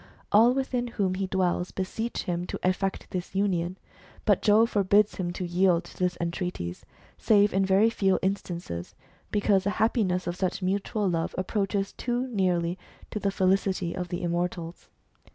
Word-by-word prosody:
All 230 +4 +6
within 255 -2 -1
whom 200 -5 -1
he 190 +1 -2
dwells 180 -1 0
beseech 220 +5 -3
him 175 0 -2
to - - -4
effect 190 +1 0
this 180 0 -5
union; 185 -2 0 0.5
but - - +3
Jove 220 +2 +4
forbids 205 +1 +3
him 175 -2 -2
to 180 - -4
yield 175 0 +2
to - - -14
their 180 0 +3
entreaties, 170 - -4 0.3
save 205 -1 +4
in 195 +1 +3
very 195 +4 +4
few 195 -4 +2
instances, 175 - -3 0.3
because 205 -2 +2
the 200 - 0
happiness 205 -5 +1
of 175 - -2
such 185 +1 -2
mutual 200 +2 0
love 165 -2 -1
approaches 195 +1 -1
too 245 +1 -2
nearly 180 -5 0 0.3
to 210 - -3
the 200 - 0
felicity 190 -2 +1
of 180 -1 -3
the 175 +1 -4
immortals. 175 0 -3
190 Hz, 160 wpm, -27 LUFS, 180-205 Hz, 0.5 s, All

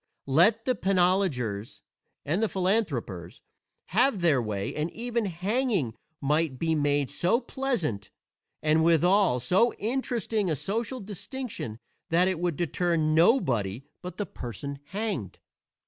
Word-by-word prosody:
Let 190 +12 +4
the 255 - +3
penologers 180 - 0 0.4
and 195 +9 +1
philanthropers 155 - -1 0.5
have 230 +2 +3
their 155 -7 +3
way 105 -3 -3
and 155 +2 -2
even 235 -1 -2
hanging 195 - 0 0.3
might 150 -1 +1
be 160 +3 0
made 145 -2 +1
so 180 +10 +2
pleasant 230 - -2 0.5
and 155 +1 +3
withal 170 -2 +4
so 190 - +2
interesting 225 -3 -1
a 155 - +1
social 220 - -3
distinction 205 - -6 0.3
that 175 +3 +4
it 185 -3 0
would 175 -2 0
deter 175 +2 0
nobody 155 - +2 0.2
but 180 0 -7
the 205 - -2
person 140 - -7
hanged. 190 - -4
175 Hz, 120 wpm, -27 LUFS, 140-210 Hz, 0.5 s, Let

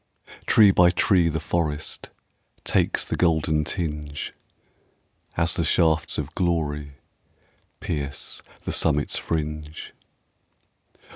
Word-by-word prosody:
Tree 105 -3 +7
by 90 -2 +5
tree 90 -1 +3
the 80 0 -2
forest 75 -4 -2 0.5
Takes - - +1
the - - -2
golden 80 -3 +2
tinge, 75 -4 -4 1.0
As 85 +1 +2
the 85 - 0
shafts 80 -1 +2
of 75 +1 -4
glory 75 -5 -1 0.9
Pierce 70 -3 -4 0.2
the - - -3
summit's 75 -2 +1
fringe. 75 -1 -4
80 Hz, 95 wpm, -24 LUFS, 75-85 Hz, 1.0 s, Tree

